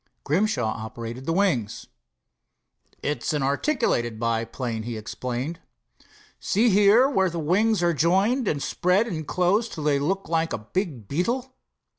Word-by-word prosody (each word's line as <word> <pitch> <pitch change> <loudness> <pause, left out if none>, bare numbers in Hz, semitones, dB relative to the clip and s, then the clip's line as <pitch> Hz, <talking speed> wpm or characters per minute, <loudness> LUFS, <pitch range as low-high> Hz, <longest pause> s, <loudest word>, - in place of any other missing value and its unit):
Grimshaw 160 - +1 0.2
operated 115 +3 -7
the - - +1
wings. 165 - 0 1.2
"It's 150 +2 -1
an 145 -2 0
articulated 135 - 0
biplane," 115 0 -2
he 115 0 -5
explained. 125 +8 -4 0.8
"See 230 +5 +2
here, 210 +6 +6
where 190 -9 +2
the 170 - -6
wings 190 +6 +2
are 170 0 +3
jointed 195 - +2
and 145 -5 -1
spread 185 +5 +2
and 160 -9 -5
close 195 +6 +1
till 155 - -6
they 145 -2 +2
look 190 +7 -1
like 165 0 0
a - - -1 0.2
big 155 - -2
beetle. 240 - -1
165 Hz, 140 wpm, -25 LUFS, 130-200 Hz, 1.2 s, here